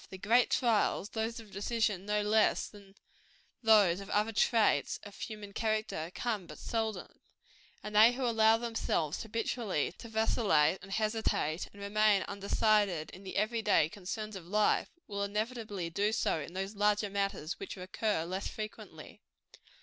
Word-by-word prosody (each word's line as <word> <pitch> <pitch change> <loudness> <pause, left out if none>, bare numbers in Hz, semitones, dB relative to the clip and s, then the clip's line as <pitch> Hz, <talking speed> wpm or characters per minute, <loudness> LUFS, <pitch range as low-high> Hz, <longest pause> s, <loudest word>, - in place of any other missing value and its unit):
The 190 - -8
great 230 +6 +3
trials 220 -4 +1
those 225 +1 -3
of 220 -3 -13
decision 205 -1 -1
no 210 0 +1
less 215 +1 +2
than 200 -2 -16 0.7
those 210 -6 +5
of 195 0 -9
other 210 +2 +1
traits 225 0 +2
of 205 -1 -11
human 210 -2 -7
character 215 -7 -2
come 210 -5 -2
but 150 - -10
seldom; 220 -5 -4 0.6
and 210 0 -6
they 220 +3 +8
who 255 +1 -2
allow 225 -1 +4
themselves, 225 -9 -1
habitually, 225 - -2
to 230 - -9
vacillate, 200 -7 +2
and 195 - -11
hesitate, 215 -7 -1
and 200 - -15
remain 205 0 +3
undecided, 200 -4 +1
in 185 - -11
the 190 - -7
every 220 +3 +1
day 200 -7 +3
concerns 210 +3 -6
of 175 -3 -9
life, 210 +3 +2 0.2
will 200 -1 -3
inevitably 210 -3 -3
do 205 +5 +1
so 220 - 0
in 155 +3 -7
those 195 +2 -3
larger 205 0 +1
matters 195 -5 -2
which - - -6
recur 185 -1 -2
less 185 +3 -3
frequently. 215 0 -8
210 Hz, 155 wpm, -32 LUFS, 195-220 Hz, 0.7 s, they